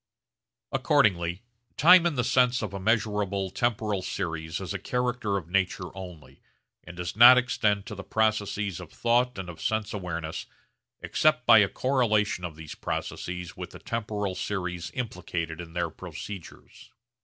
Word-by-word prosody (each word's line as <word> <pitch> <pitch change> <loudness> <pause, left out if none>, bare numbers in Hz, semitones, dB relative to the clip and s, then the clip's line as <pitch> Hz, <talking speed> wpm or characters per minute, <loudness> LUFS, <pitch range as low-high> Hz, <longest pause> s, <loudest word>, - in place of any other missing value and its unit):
Accordingly 85 -1 +2 0.3
time 175 +4 +7
in 165 - -2
the 125 - +1
sense 125 0 +3
of 100 -3 -4
a 100 - -4
measurable 100 -2 0
temporal 110 -3 0
series 80 -4 -4
is 95 0 -5
a 95 - -3
character 125 -2 -1
of 85 -4 -6
nature 95 0 -1
only, 85 -8 -10 0.4
and 85 - -11
does 90 +1 -4
not 120 +3 +10
extend 105 -5 +1
to - - -7
the 100 -1 -7
processes 105 -3 0
of 90 -3 -10
thought 120 +1 +1
and 95 - -5
of 85 -2 -9
sense 110 -1 -1
awareness 85 -5 -4 0.6
except - - +2
by - - +8
a - - +4
correlation 110 -8 +1
of 85 -3 -5
these 80 -1 -9
processes 90 -1 -5
with - - -7
the - - -11
temporal 105 -4 -3
series 90 -3 -3
implicated 85 -8 -4
in 85 -1 -11
their 85 -2 -1
procedures. 95 +1 -10
100 Hz, 155 wpm, -27 LUFS, 90-110 Hz, 0.6 s, not